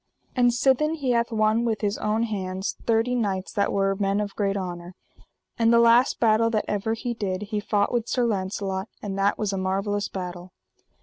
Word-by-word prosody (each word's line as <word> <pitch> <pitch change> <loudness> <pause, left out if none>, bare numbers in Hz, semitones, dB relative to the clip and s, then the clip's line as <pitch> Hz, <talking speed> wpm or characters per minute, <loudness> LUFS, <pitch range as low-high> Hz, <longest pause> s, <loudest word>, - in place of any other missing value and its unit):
And 245 -1 +4
sithen 270 +6 +2
he 275 -5 -1
hath 235 0 +1
won 215 +1 +2
with 225 -3 -1
his 205 -1 -1
own 215 +2 0
hands 190 -3 -3
thirty 230 +2 +2
knights 200 -6 -2
that 200 0 +1
were 195 0 +1
men 200 0 0
of 205 -1 -3
great 200 -1 0
honour. 175 -1 -6 0.6
And 230 0 +4
the 235 - +6
last 235 +3 +4
battle 225 0 +3
that 215 -2 0
ever 210 +2 -1
he 240 +1 -3
did 200 -3 -3
he 210 0 -3
fought 205 0 0
with 240 -1 -1
Sir 250 - +1
Launcelot; 190 -1 -2
and 200 -2 -4
that 200 +1 +2
was 205 -2 -1
a 195 - -2
marvellous 195 +2 -1
battle. 180 -1 -7
210 Hz, 195 wpm, -25 LUFS, 195-230 Hz, 0.6 s, the